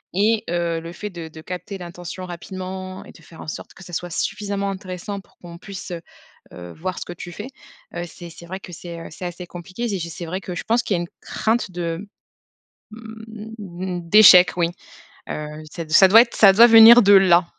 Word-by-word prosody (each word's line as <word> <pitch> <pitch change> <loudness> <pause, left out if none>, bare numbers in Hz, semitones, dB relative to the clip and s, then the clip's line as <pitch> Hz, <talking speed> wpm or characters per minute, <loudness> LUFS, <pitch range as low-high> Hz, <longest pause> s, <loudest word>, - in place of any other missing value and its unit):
et 215 +2 +2
heu, 170 -1 -1
le 165 +1 -9
fait 210 +4 -7
de 170 -2 -8
de 160 0 -12
capter 185 +3 -7
l'intention 175 +1 -8
rapidement 185 +1 -7
et - - -13
de 165 - -18
faire 165 - -14
en - - -10
sorte - - -7
que 190 - -14
ça 175 -1 -13
soit 175 +1 -4
suffisamment 200 +2 -3
intéressant 190 +1 -6
pour - - -21
qu'on 170 -1 -11
puisse, 195 +1 -9
heu 170 -1 -5 0.5
heu, 90 -1 -10
voir 185 +3 -5
ce - - -6
que 175 - -8
tu 175 0 -9
fais, 210 +8 -8 0.5
heu, 175 - -4
c'est 170 +1 -11
c'est 170 +1 -13
vrai 190 +2 -7
que 180 - -11
c'est, 170 0 -9
heu, - - -9
c'est 180 +3 -7
assez 175 0 -7
compliqué 185 +7 -8
et 200 -5 -2
je 170 0 -5
c'est 170 +1 -8
vrai 185 +4 -4
que 180 -2 -7
je - - -6
pense 235 +2 +1
qu'il 195 - -1
y - - -2
a - - -2
une 170 - -7
crainte 220 -2 -1
de, 175 +2 -4 0.9
mmh, 220 -5 -8
d'échec, 185 -3 +8
oui, 170 -1 +1 0.6
heu, 150 0 -4 0.3
ce 165 -2 -6
ça 190 +5 +7
doit 225 +3 +9
être 235 - -2
ça 200 -3 +7
doit 235 +4 +8
venir 230 +1 +9
de 205 0 +5
là. 180 -2 +6
185 Hz, 220 wpm, -21 LUFS, 170-205 Hz, 0.9 s, doit